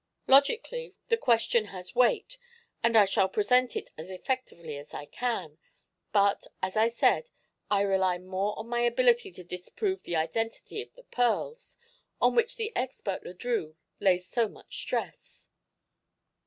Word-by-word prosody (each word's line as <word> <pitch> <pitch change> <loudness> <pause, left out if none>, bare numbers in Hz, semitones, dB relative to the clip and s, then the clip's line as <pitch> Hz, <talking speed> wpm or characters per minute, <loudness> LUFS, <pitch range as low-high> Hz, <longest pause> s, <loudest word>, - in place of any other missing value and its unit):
Logically, 465 - +3
the 460 - +5
question 235 - +2
has 185 -3 -9
weight 250 - +2 0.4
and 230 -1 +4
I 210 - +8
shall 190 0 +2
present 245 +5 +2
it - - -4
as 160 +4 -7
effectively 185 - -4
as 145 +1 -9
I 145 - -6
can; 170 -6 -3 0.5
but, 200 -1 +3
as 185 0 -3
I 220 +1 +5
said, 235 - +2 0.4
I 200 -1 +3
rely 190 -2 +2
more 185 +3 -2
on 220 - -6
my 240 0 -1
ability 240 0 +3
to 180 - -9
disprove 180 - -3
the 175 - -4
identity 225 - -2
of 455 - -11
the - - -16
pearls, 460 - -1 0.4
on - - +4
which 470 -1 +2
the 450 -1 -4
expert 245 -6 -3
Le 180 - -9
Drieux 180 -7 -2 0.2
lays 180 -1 +2
so 235 +1 +1
much - - -13
stress. - - -5
225 Hz, 155 wpm, -29 LUFS, 185-255 Hz, 0.5 s, I